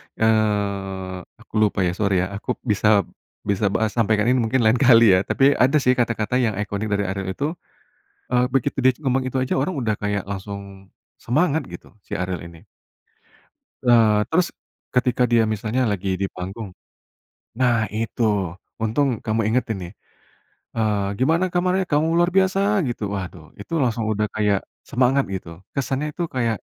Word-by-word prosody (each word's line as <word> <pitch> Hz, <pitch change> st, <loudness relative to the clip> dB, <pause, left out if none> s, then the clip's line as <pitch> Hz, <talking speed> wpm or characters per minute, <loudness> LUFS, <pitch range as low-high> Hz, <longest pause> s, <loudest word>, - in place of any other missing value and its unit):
eee, 100 Hz, -4 st, 0 dB, 0.2 s
aku -, -, -22 dB
lupa, 100 Hz, -3 st, +2 dB
ya 90 Hz, -, +1 dB
sori 95 Hz, -1 st, +1 dB
ya, 95 Hz, -, -4 dB
aku 100 Hz, +5 st, -3 dB
bisa 105 Hz, -2 st, +3 dB, 0.4 s
bisa 100 Hz, +1 st, 0 dB
bahas 110 Hz, +2 st, 0 dB
sampaikan 110 Hz, -2 st, +2 dB
ini 130 Hz, -, +3 dB
mungkin 120 Hz, +2 st, +1 dB
lain 110 Hz, +2 st, +3 dB
kali 115 Hz, -5 st, +7 dB
ya. 95 Hz, -, +5 dB
Tapi, 135 Hz, +1 st, +4 dB
ada 130 Hz, +1 st, +3 dB
sih 125 Hz, 0 st, +3 dB
kata-kata 115 Hz, +1 st, 0 dB
yang 115 Hz, -5 st, +1 dB
iconic 105 Hz, +1 st, -3 dB
dari 100 Hz, 0 st, 0 dB
Ariel 95 Hz, 0 st, -3 dB
itu, 145 Hz, +2 st, -1 dB, 0.8 s
eee, 125 Hz, 0 st, +2 dB
begitu 135 Hz, +1 st, 0 dB
dia 130 Hz, -, +5 dB
ngomong 130 Hz, 0 st, +2 dB
itu 130 Hz, -, -2 dB
aja 130 Hz, 0 st, 0 dB
orang 165 Hz, +7 st, 0 dB
udah 110 Hz, -4 st, 0 dB
kayak 105 Hz, -2 st, -3 dB
langsung, 100 Hz, -1 st, -8 dB, 0.2 s
semangat 155 Hz, +4 st, +1 dB
gitu, 90 Hz, -, -11 dB
si -, -, -5 dB
Ariel 90 Hz, -1 st, -3 dB
ini. 85 Hz, -1 st, -13 dB, 1.2 s
Eee, 110 Hz, -3 st, +5 dB
terus, 175 Hz, +1 st, +2 dB, 0.4 s
ketika 125 Hz, 0 st, +2 dB
dia 115 Hz, -1 st, +5 dB
misalnya 110 Hz, +3 st, -1 dB
lagi 100 Hz, -1 st, -2 dB
di 100 Hz, -, +1 dB
panggung, 95 Hz, +4 st, -6 dB, 0.9 s
nah 125 Hz, -2 st, +3 dB, 0.2 s
itu, 115 Hz, +1 st, -2 dB, 0.6 s
untung 125 Hz, +6 st, +1 dB, 0.2 s
kamu 110 Hz, +1 st, 0 dB
ingetin 115 Hz, -2 st, 0 dB
nih, 85 Hz, -, -8 dB, 0.8 s
eee, 105 Hz, -3 st, 0 dB
"Gimana 165 Hz, +8 st, +2 dB
kabarnya 185 Hz, +1 st, +1 dB
kamu 150 Hz, +1 st, +3 dB
luar 175 Hz, +1 st, +3 dB
biasa?" 190 Hz, 0 st, +3 dB, 0.3 s
gitu 120 Hz, -2 st, -4 dB
waduh, 90 Hz, -4 st, -6 dB
itu 165 Hz, -, -8 dB
langsung 115 Hz, -2 st, -1 dB
udah 105 Hz, 0 st, 0 dB
kayak, 105 Hz, -2 st, +2 dB, 0.3 s
semangat 130 Hz, +2 st, +3 dB
gitu. 90 Hz, -, -7 dB, 0.3 s
Kesannya 135 Hz, +2 st, -1 dB
itu 170 Hz, -, -4 dB
kayak, 115 Hz, -4 st, 0 dB
110 Hz, 160 wpm, -22 LUFS, 100-130 Hz, 1.2 s, kali